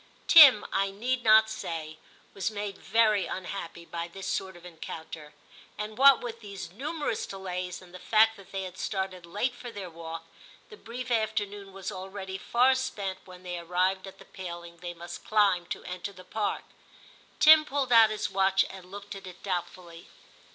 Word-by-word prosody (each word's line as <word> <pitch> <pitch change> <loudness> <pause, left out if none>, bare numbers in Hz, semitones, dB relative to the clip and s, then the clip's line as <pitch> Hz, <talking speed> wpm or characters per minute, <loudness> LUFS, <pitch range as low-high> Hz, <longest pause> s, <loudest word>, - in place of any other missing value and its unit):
Tim, 285 -10 +9
I 195 0 +2
need 245 +6 -2
not 220 0 +7
say, 160 -7 -6 0.3
was 195 +1 -1
made 205 -2 -5
very 215 -3 +2
unhappy 175 -2 -6
by 170 0 -5
this 190 +2 -9
sort 190 -2 -3
of 175 - -16
encounter; 160 -3 -9 0.4
and 210 +1 -5
what 275 +1 +7
with 230 -1 -6
these 200 -5 -8
numerous 290 - -3
delays 185 -2 -5
and 180 -1 -17
the 185 - -9
fact 220 +2 +4
that 195 - -15
they 195 -1 -3
had 185 0 -8
started 190 -3 -3
late 210 +8 -1
for 245 0 -9
their 200 -6 -7
walk, 165 0 -8 0.5
the - - -9
brief 250 - -7
afternoon 205 -3 -1
was 190 0 -6
already 190 0 -6
far 250 +6 +3
spent 205 -8 -3
when 180 -1 -13
they 175 -1 -5
arrived 185 +3 0
at 190 - -11
the - - -15
paling 170 -2 -8
they 175 0 -7
must 175 0 -9
climb 200 -5 +2
to - - -5
enter 180 +2 -6
the 185 -2 -13
Park. 210 +2 -2 0.8
Tim 310 0 +9
pulled 275 -3 -2
out 225 -1 +8
his 215 -1 -2
watch 195 0 +3
and 190 -2 -11
looked 205 +1 -8
at 195 -1 -9
it 180 0 -12
doubtfully. 175 -2 -5
195 Hz, 180 wpm, -28 LUFS, 180-220 Hz, 0.8 s, Tim